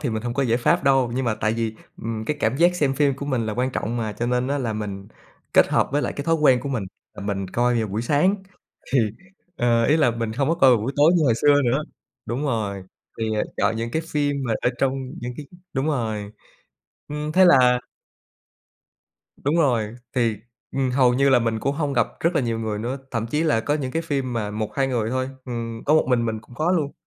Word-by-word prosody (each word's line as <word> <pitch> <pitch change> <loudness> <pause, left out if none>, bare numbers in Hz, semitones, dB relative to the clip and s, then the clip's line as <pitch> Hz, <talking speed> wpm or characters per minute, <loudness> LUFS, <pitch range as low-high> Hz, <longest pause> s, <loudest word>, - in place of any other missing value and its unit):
thì 140 - -1
mình 110 -1 -3
không 120 -1 -3
có 140 - +1
giải 120 -2 +1
pháp 125 - +2
đâu, 135 -3 +3
nhưng 130 - -1
mà 115 -3 +1
tại 110 0 0
vì, 115 -1 -2 0.3
ừm, 110 -1 -3
cái 150 +6 -2
cảm 135 - +1
giác 175 +4 +4
xem 145 -6 +1
phim 140 -1 +2
của 140 +1 -6
mình 125 -5 -1
là 110 - -2
quan 125 +3 0
trọng 120 -1 -3
mà 110 -2 -2
cho 115 +4 -3
nên 125 +1 0
á 145 +1 0
là 120 -5 -2
mình 100 -2 -5 0.4
kết - - +5
hợp - - +2
với 145 - +1
lại - - -2
cái 140 - -5
thói 165 - +2
quen 140 -6 +4
của 140 - -5
mình 125 -6 -2 0.3
là - - -8
mình 100 -2 -2
coi 120 +3 +1
vào 110 - -1
buổi 105 +4 -2
sáng. 150 +10 +3 0.6
Thì 135 - +4 0.6
ờ, 120 -2 +2
ý 150 +6 +4
là 145 -6 +3
mình 115 -1 -3
hông 135 +4 0
có 165 - +3
coi 135 -6 +5
vào 120 - +5
buổi 135 +5 -2
tối 150 +4 +5
như 165 - +2
hồi 120 -5 +4
xưa 145 +4 +4
nữa 130 +4 +1 0.4
đúng 125 +5 -3
rồi, 105 -8 -2 0.4
thì 115 - -1 0.3
chọn - - +1
những 115 +1 -3
cái 160 +6 -1
phim 145 -1 +1
mà 115 - +1
ở - - +2
trong 135 -1 +2 0.3
những 120 +1 -4
cái 150 - -8 0.3
đúng 135 +1 -1
rồi. 110 -8 -2 0.8
Ừm, 150 +1 -4
thế 185 +3 +6
là 125 -7 +6 1.6
Đúng 145 +4 0
rồi, 120 -9 +1 0.2
thì, 115 -3 +1 0.4
ừm, 135 -1 0
hầu 125 -1 +3
như 140 +2 +3
là 130 -2 +6
mình 115 -1 -1
cũng 140 +4 -1
hông 145 -2 -1
gặp 120 -4 +2
rất 170 +2 +1
là - - +3
nhiều 115 -3 -1
người 110 -2 -3
nữa, 120 +5 -3
thậm 115 -2 -2
chí 150 +7 0
là 150 -9 +2
có 145 +6 0
những 135 -4 -3
cái 165 - -1
phim 140 -5 -2
mà 110 -3 -2
1,2 110 +6 -1
người 115 -4 -1
thôi, 130 +1 -1 0.2
ừm, 115 -2 -5
có 150 - +4
một 155 - +4
mình 120 -2 +2
mình 110 -1 -2
cũng 120 - -17
có 155 +7 0
luôn. 155 -6 0
125 Hz, 245 wpm, -23 LUFS, 115-145 Hz, 1.6 s, thế